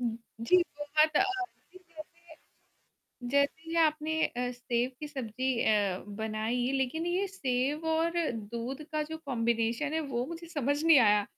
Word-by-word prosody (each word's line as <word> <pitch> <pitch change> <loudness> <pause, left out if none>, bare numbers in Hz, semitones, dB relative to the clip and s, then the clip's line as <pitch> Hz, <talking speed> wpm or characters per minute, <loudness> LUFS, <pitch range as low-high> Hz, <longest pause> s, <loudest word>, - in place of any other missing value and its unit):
जी। 235 +8 +1 0.2
बहुत 305 +1 +2
अ, - - +6 0.5
जी 370 - -13
जैसे 335 -1 -14 1.1
जैसे 320 +4 +1
आपने 315 0 +2
अ, 245 0 -3
सेव 245 0 -1
की 300 - -5
सब्ज़ी 260 -3 -4 0.2
अ, 205 -4 +2 0.2
बनाई 220 +3 -1
लेक़िन 315 +6 -1
ये 365 +3 +1
सेव 285 -3 -1
और 325 +1 +2 0.2
दूध 235 +6 -5
का 305 0 +1
जो 320 +1 -6
कॉम्बिनेशन 235 +2 0
है 320 - +1
वो 255 -5 -2
मुझे 335 +2 -7
समझ 290 -2 0
नहीं 325 -3 +8
आया। 210 -3 +5
280 Hz, 140 wpm, -30 LUFS, 235-320 Hz, 1.1 s, नहीं